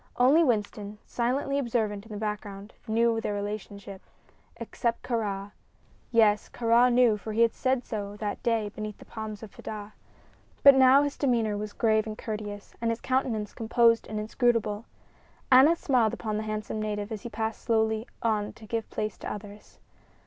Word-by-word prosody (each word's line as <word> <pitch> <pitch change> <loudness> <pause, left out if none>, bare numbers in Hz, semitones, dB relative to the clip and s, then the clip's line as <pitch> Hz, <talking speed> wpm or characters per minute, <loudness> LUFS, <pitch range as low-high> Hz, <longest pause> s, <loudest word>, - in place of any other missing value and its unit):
Only 275 +7 +5
Winston, 210 -4 -1
silently 270 +3 -1
observant 225 -5 -1
in - - -14
the 210 - -5
background, 210 -1 -5
knew 225 +1 +2
their 205 - -2
relationship 200 -1 -6 0.6
except 235 -1 -3
Kāra. 205 -4 -2 0.6
Yes; 215 -3 +3
Kāra 235 +1 +4
knew, 240 -3 +4
for 215 +1 -6
he 225 - +1
had 230 -1 +4
said 260 -1 0
so 205 -3 -5
that 205 -1 -4
day 225 -3 0
beneath 215 0 -6
the - - -14
palms 220 -1 -7
of 215 - -9
Fedah. 210 0 -8 0.7
But 280 - +10
now 265 +1 +6
his 285 -1 -3
demeanor 230 -6 +1
was 210 0 -4
grave 220 -1 +1
and 215 0 -5
courteous, 210 -2 -6
and 230 - +1
his 230 0 -1
countenance 240 -5 -1
composed 230 0 +3
and 215 0 -4
inscrutable. 220 -1 0 0.7
Aneth 275 +6 +7
smiled 240 -7 +2
upon 215 -3 -3
the - - -1
handsome 215 0 -3
native 210 0 -3
as 215 -2 -4
he 235 - -6
passed 220 0 -3
slowly 220 0 +1 0.2
on 215 -2 0
to 220 - -14
give 225 +1 -3
place 215 -1 -4
to - - -5
others. 205 0 -10
220 Hz, 170 wpm, -28 LUFS, 210-235 Hz, 0.7 s, But